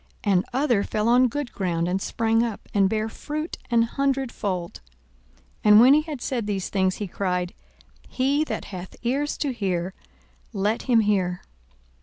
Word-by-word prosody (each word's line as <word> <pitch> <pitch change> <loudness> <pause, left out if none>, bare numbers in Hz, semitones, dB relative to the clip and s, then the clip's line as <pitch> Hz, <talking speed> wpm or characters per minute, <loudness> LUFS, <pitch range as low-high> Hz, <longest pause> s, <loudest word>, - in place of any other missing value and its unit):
42:008:008 205 - +2
And 180 0 +2
other 250 -6 +2
fell 215 +1 -1
on 250 +2 +5
good 280 +1 -4
ground, 170 -3 -1
and 185 +2 -1
sprang 225 +1 +1
up, 230 -3 -3
and 195 -2 +3
bare 220 +1 -1
fruit 305 +7 -5
an 235 -1 +4
hundredfold. 235 - -2 0.8
And 210 0 +8
when 255 +4 +8
he 305 - +5
had 305 -5 -7
said 235 -5 -2
these 195 -3 -2
things, 190 -2 +1
he 210 - -4
cried, 180 -1 -2 0.6
He 280 +4 +1
that - - -4
hath 180 0 -7
ears 275 +5 -1
to 280 -3 -1
hear, 185 -5 -2 0.6
let 205 +3 0
him 230 -2 +5
hear. 190 -4 0
220 Hz, 165 wpm, -24 LUFS, 190-255 Hz, 0.8 s, And